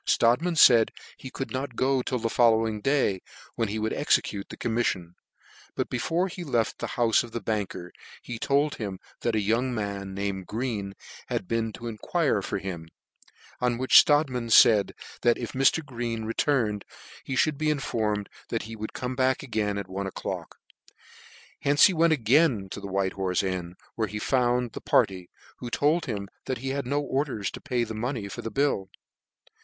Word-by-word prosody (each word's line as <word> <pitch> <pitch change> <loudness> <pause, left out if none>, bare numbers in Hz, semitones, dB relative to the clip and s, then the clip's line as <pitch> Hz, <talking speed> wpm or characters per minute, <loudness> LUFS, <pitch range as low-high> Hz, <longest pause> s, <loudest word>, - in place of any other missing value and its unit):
Strodtman 140 +10 +3
faid 120 -7 +7 0.3
he 130 - -9
could 135 - -5
not 130 -1 -4
go 130 +1 +2
till 125 - -2
the 115 -1 -1
following 115 -2 +3
day, 135 -8 +1 0.3
when 115 - -1
he 105 +2 -3
would 110 0 -1
execute 105 -8 0
the - - -9
commiflion: 105 -7 -1 0.6
but - - -2
before 165 +9 0
he 180 -1 -7
left 120 -8 -1
the - - -3
houfe 120 0 +3
the 115 - -4
banker 105 -6 -3 0.5
told 145 +4 +1
him 100 -4 -4 0.2
that 115 - -1
a - - +2
young 115 +5 +1
man, 100 -2 -4
named 100 -2 -3
Green, 105 -4 -3 0.3
had 95 - -3
been 115 0 -1
to 105 +5 -9
enquire 110 -3 0
for - - -3
him; 85 -4 -6 0.7
on 125 -1 +1
which 130 +1 +7
Strodtman 135 -6 +1
faid 110 -2 +6 0.3
that 120 -1 +3
if 120 - -5
Mr. 135 +4 +2
Green 115 -4 -4
re 115 - -3
turned, 115 -9 +1 0.4
he 130 - -4
fhould 150 +2 +1
be 155 0 +1
informed 110 -8 -1 0.2
that - - -2
he 110 +1 -8
would 110 0 -6
come 125 0 -4
back 130 +1 +1
at 105 -6 -2
one 95 +1 -4
o'clock. 95 - -5 1.0
Hence 145 +1 +5
he 190 - +4
went 165 0 +3
again 125 - +3
to - - -5
the 100 - -7
White 95 0 -1
Horfe 95 -1 0
Inn, 90 -2 -3 0.2
where 110 -1 -1
he 105 - -5
found 125 +1 +1
the - - -8
party, 90 -2 +1 0.3
who 120 - -6
told 150 +7 +1
him 100 -4 -3 0.2
that 130 -1 -1
he 135 +3 -4
had 140 -1 -2
no 145 +3 +1
orders 135 -7 -2
to - - -9
pay 125 -4 0
the 110 - -5
money 115 -1 -3
for 100 - -7
the 115 - -4
bill. 110 -6 0
115 Hz, 180 wpm, -27 LUFS, 100-130 Hz, 1.0 s, faid